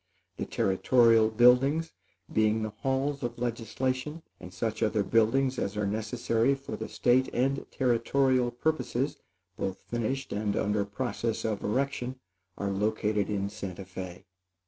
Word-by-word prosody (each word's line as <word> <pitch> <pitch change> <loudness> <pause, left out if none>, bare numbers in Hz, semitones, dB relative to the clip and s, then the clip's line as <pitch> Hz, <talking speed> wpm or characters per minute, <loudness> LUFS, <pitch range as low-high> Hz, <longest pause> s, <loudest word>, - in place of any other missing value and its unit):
The - - -3
Territorial 115 +3 +4
buildings, 125 +8 +4 0.4
being 110 0 +2
the 110 - -3
halls 135 +5 -1
of 120 -2 -3
legislation, 125 +6 -2 0.2
and 90 - -10
such 110 +4 -3
other 105 -2 +2
buildings 130 +5 +2
as 100 +2 -2
are 105 - 0
necessary 115 +4 +1
for 135 0 -7
the - - -6
State 130 +1 +2
and 135 +3 0
Territorial 130 0 +2
purposes, 135 0 -1 0.4
both 95 -1 -2
finished 120 +3 -3
and 105 0 -1
under 105 0 +1
process 115 +1 -3
of 110 -2 -2
erection, 130 +2 -1 0.4
are 100 -1 -2
located 105 +1 0
in 100 -1 -1
Santa 100 -2 -7
Fé. 95 -1 -8
115 Hz, 135 wpm, -29 LUFS, 105-130 Hz, 0.4 s, Territorial